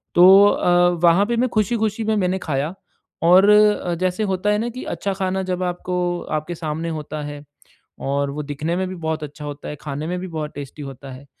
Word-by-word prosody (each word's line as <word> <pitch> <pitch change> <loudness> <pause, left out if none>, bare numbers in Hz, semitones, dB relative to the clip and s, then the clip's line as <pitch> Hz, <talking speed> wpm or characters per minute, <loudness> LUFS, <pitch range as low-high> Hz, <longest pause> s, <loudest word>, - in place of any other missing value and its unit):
तो 175 - +8 0.2
अ, 175 -2 +3
वहाँ 175 +4 +5
पे 235 +2 -1
मैं 250 +2 +2
खुशी-खुशी 220 0 0
में 220 0 +1
मैंने 190 -2 0
खाया 150 0 -2 0.5
और 185 +4 +6
अ, 210 -4 +4
जैसे 185 +4 -1
होता 195 0 -1
है 210 - +2
ना 235 +2 -2
कि 255 +2 -7
अच्छा 200 - -2
खाना 190 0 -2
जब 185 -1 -2
आपको 180 0 -3 0.4
आपके 155 +3 -7
सामने 160 0 -4
होता 150 0 -6
है, 145 0 -7 0.6
और 140 +1 -1
वो 150 +2 -5
दिखने 150 +4 -3
में 185 +1 -1
भी 185 - -6
बहुत 160 -2 -3
अच्छा 150 0 -8
होता 145 0 -7
है 150 - -5
खाने 150 +1 -5
में 180 +1 -2
भी 185 - -6
बहुत 155 -3 -5
टेस्टी 145 +1 -8
होता 135 -1 -9
है, 130 +2 -11
175 Hz, 210 wpm, -21 LUFS, 150-190 Hz, 0.6 s, तो